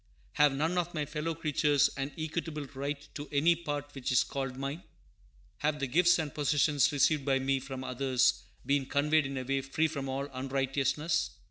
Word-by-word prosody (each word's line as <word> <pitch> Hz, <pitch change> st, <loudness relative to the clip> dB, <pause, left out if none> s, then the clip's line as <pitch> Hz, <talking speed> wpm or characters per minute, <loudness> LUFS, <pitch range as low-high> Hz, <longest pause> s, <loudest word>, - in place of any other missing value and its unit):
Have 145 Hz, -2 st, +4 dB
none 160 Hz, +6 st, 0 dB
of 175 Hz, 0 st, -3 dB
my 150 Hz, -1 st, -1 dB
fellow 155 Hz, +3 st, -3 dB
creatures 150 Hz, -2 st, +2 dB
an 135 Hz, +1 st, -3 dB
equitable 155 Hz, -1 st, -3 dB
right 140 Hz, +1 st, -4 dB
to 145 Hz, 0 st, -7 dB
any 155 Hz, +4 st, +4 dB
part 145 Hz, -3 st, -5 dB
which 135 Hz, -2 st, -3 dB
is 125 Hz, -, +4 dB
called 135 Hz, -2 st, -4 dB
mine? 140 Hz, +5 st, -4 dB, 0.8 s
Have 150 Hz, 0 st, 0 dB
the 140 Hz, -, 0 dB
gifts 175 Hz, +6 st, +4 dB
and 155 Hz, -4 st, -3 dB
possessions 145 Hz, -1 st, +2 dB
received 145 Hz, 0 st, +2 dB
by 135 Hz, -1 st, +2 dB
me 135 Hz, 0 st, +1 dB
from 130 Hz, 0 st, -7 dB
others 130 Hz, 0 st, +1 dB, 0.2 s
been 140 Hz, -1 st, +1 dB
conveyed 150 Hz, +1 st, +2 dB
in 135 Hz, 0 st, -5 dB
a 130 Hz, -, -2 dB
way 135 Hz, +1 st, 0 dB
free 135 Hz, +4 st, 0 dB
from 140 Hz, -4 st, -4 dB
all 135 Hz, +1 st, -2 dB
unrighteousness? 135 Hz, +4 st, -1 dB
145 Hz, 185 wpm, -31 LUFS, 135-155 Hz, 0.8 s, Have